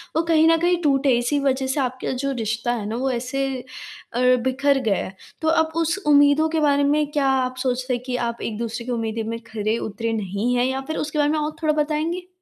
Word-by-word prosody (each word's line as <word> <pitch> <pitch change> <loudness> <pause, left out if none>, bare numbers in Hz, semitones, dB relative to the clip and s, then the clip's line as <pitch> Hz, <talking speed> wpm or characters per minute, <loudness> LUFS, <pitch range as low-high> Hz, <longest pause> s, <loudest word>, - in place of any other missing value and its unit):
वो 320 - +3
कहीं 325 -1 +4
न 330 - +4
कहीं 350 0 +2
टूटे, 275 -3 +3
इसी 245 +4 0
वज़ह 270 -1 0
से 265 +3 -1
आपका 255 -1 -2
जो 275 +2 -2
रिश्ता 225 +2 -1
है 225 -4 -4
ना, 220 - -3
वो 260 +2 0
ऐसे 255 +3 -2 0.7
अ, 240 - -1 0.2
बिखर 270 +2 +2
गया 210 -4 +1
है, 195 - -10 0.3
तो 320 - -1
अब 320 0 +2
उस 330 +2 +1
उम्मीदों 290 +1 +5
के 320 0 0
बारे 285 -2 +3
में 295 +1 +2
क्या 290 -2 +1
आप 255 -1 0
सोचते 255 0 -1
हैं 245 - -2
कि 255 -1 -2
आप 235 0 -5
एक-दूसरे 230 +1 -4
की 250 - -4
उम्मीदें 225 -1 -2
में 230 0 -4
खरे 220 0 -1
उतरे 225 +1 -3
नहीं 210 +3 -1
हैं 245 0 +2
या 265 +1 -1
फ़िर 315 - -3
उसके 305 0 -3
बारे 290 0 +3
में 310 - 0
और 300 0 -3
थोड़ा 310 -1 +3
बताएँगे? 320 +4 -3
265 Hz, 230 wpm, -22 LUFS, 235-300 Hz, 0.7 s, उम्मीदों